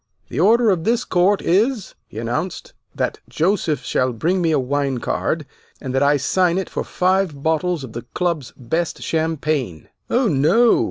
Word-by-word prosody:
The 130 - -4
order 225 +5 +5
of 175 -4 0
this 235 +5 +1
court 190 +3 +2
is," 215 +5 +1
he - - -12
announced, 120 +11 -3 0.2
"that - - -2
Joseph 165 -3 0
shall 130 -1 0
bring 175 +10 0
me 165 - +2
a 155 - +3
wine 135 0 -1
card, 115 - -2 0.3
and 130 - -5
that 135 - +1
I 145 +1 +4
sign 175 +5 +1
it 190 - -3
for - - -2
five 185 -6 0
bottles 160 0 0
of 120 -4 -9
the 120 - -5
Club's 170 -7 -1
best 160 +8 -2
champagne." 155 - -2 0.2
"Oh, 245 0 +2
no!" 185 - +4
160 Hz, 170 wpm, -20 LUFS, 140-190 Hz, 0.3 s, order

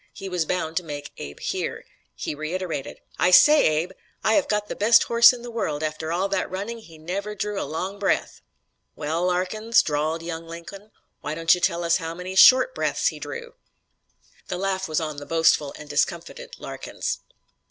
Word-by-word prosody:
He 195 - -8
was 180 -3 -1
bound 165 -1 -2
to 180 - 0
make 145 -3 -7
Abe 70 0 -8
hear. - - -3 0.3
He - - -4
reiterated: 155 -1 -4 0.2
"I - - +4
say, 295 +11 +7 0.2
Abe, 180 - -10 0.3
I 220 - +3
have - - +3
got 210 -1 0
the - - -5
best 225 +3 +5
horse 235 +1 +7
in 245 -2 -8
the 240 - -7
world; 155 -10 -2
after 155 +1 -3
all 180 +3 0
that 195 - -1
running 205 +5 -5
he 165 -7 -15
never 195 +6 -4
drew 210 0 -3
a - - -5
long 185 +6 -4
breath." 200 - -1 0.5
"Well, 165 +4 -1
Larkins," 215 +6 +2
drawled 155 +2 -1
young 165 -1 -6
Lincoln, 170 +5 -10 0.3
"why 150 +2 -4
don't 165 0 +4
you 180 - -1
tell 170 -2 +1
us 170 0 +3
how 165 -2 -5
many 180 +2 -6
short 260 - +7
breaths - - 0
he - - -9
drew." 470 0 -7 0.9
The - - -3
laugh 190 0 -1
was 155 -1 0
on 155 -2 -4
the 145 - -7
boastful 160 -3 +3
and 150 - -10
discomfited 170 - -2
Larkins. - - -5
180 Hz, 190 wpm, -24 LUFS, 160-205 Hz, 0.9 s, say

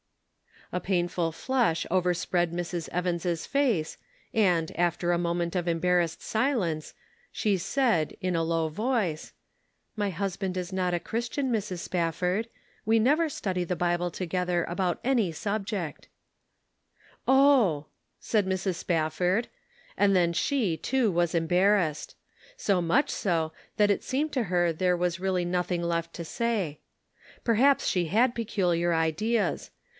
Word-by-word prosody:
A 180 - 0
painful 175 -2 0
flush 235 -6 0
overspread 175 -1 +1
Mrs. 175 -1 -3
Evans' 175 -1 -1
face, 240 - 0 0.4
and, 180 -8 +2
after 175 0 +1
a 175 - +2
moment 170 0 -1
of 175 -1 -1
embarrassed 170 0 +1
silence, 215 - -1 0.4
she 205 -3 +1
said, 195 - +1
in 185 -1 0
a 165 - +1
low 165 -1 0
voice: 205 -3 -1 0.3
" - - -47
My 205 -1 0
husband 190 0 -3
is 180 0 -4
not 185 -1 0
a 175 - +1
Christian, 240 +7 -2
Mrs. 195 -6 -2
Spaf 170 -3 -1
ford. 185 +5 0 0.4
We 225 +1 +4
never 300 +8 +3
study 185 - -2
the 180 - -2
Bible 175 0 0
together 180 0 -1
about 175 +1 -2
any 235 -10 +1
subject." 200 -2 -3 0.6
" - - -50 0.4
Oh! 260 - +4 0.2
" - - -50
said 210 -4 0
Mrs. 190 -1 -1
Spafford, 180 +6 0 0.5
and 200 -1 +4
then 175 -2 +3
she, 200 -2 0
too, 245 - +1
was 175 -1 +1
embarrassed; 175 -1 +2 0.4
so 195 - +1
much 260 - +2
so, 165 -5 0 0.3
that 205 -1 +4
it 200 - 0
seemed 295 +4 -1
to 255 -4 0
her 175 -3 +1
there 180 +2 +1
was 175 0 -1
really 185 -1 0
nothing 180 0 -1
left 170 -1 -2
to 170 - -6
say. 200 -7 -2 0.6
Perhaps 255 +5 +3
she 180 -2 +1
had 230 +9 +2
peculiar 180 -7 0
ideas. 165 +8 0
180 Hz, 140 wpm, -27 LUFS, 170-215 Hz, 0.6 s, We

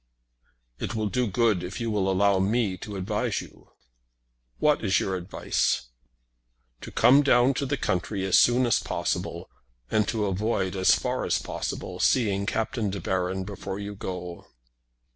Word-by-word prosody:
"It 105 - -4
will 110 -1 -1
do 125 +2 0
good 105 -2 +2
if 90 +6 -6
you 115 -1 -2
will 100 -2 +1
allow 100 0 +3
me 100 0 +1
to 105 +3 -8
advise 105 +2 -1
you." - - -13 0.9
"What 150 -4 +2
is 95 -2 +3
your 95 - -1
advice?" 90 -8 -1 0.9
"To - - -8
come 140 +3 +5
down 135 -2 +4
to 140 +1 -2
the 140 +1 -1
country 95 -1 -2
as 95 - +5
soon 125 +1 +4
as 120 - +3
possible, - - -3 0.4
and 105 -1 +2
to 110 -3 -1
avoid, 100 -1 -1
as 95 -1 +5
far - - -2
as - - +1
possible, - - -5
seeing 100 -5 +2
Captain 110 -1 -1
De 100 +1 -4
Baron 95 +1 -1
before 100 0 -6
you 100 0 -5
go." 90 -3 -7
100 Hz, 160 wpm, -26 LUFS, 95-115 Hz, 0.9 s, come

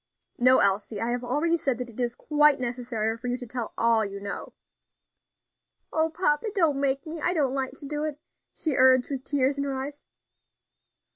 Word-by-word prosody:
"No, 255 +1 +6
Elsie; 200 +1 +1
I 230 +3 -1
have 245 0 -2
already 295 +7 +1
said 270 -6 -1
that 245 -1 -6
it 225 - -13
is 240 -1 -1
quite 300 0 +3
necessary 240 -3 -2
for 245 - -6
you 245 0 -1
to 250 - -7
tell 240 -1 -5
all 230 -1 +3
you 200 -1 -5
know." 200 0 -6 1.4
"O 320 0 +2
papa! 315 +1 0
don't 310 -7 +2
make 275 +1 +1
me; 315 0 -6
I 355 - +2
don't 280 -6 +1
like 265 -1 -2
to - - -10
do 295 +1 -3
it," 300 -1 -4 0.3
she 315 - -2
urged, 255 0 +5
with 265 -2 -3
tears 280 0 0
in - - 0
her 275 -1 -2
eyes. 280 +2 -6
265 Hz, 195 wpm, -26 LUFS, 240-295 Hz, 1.4 s, No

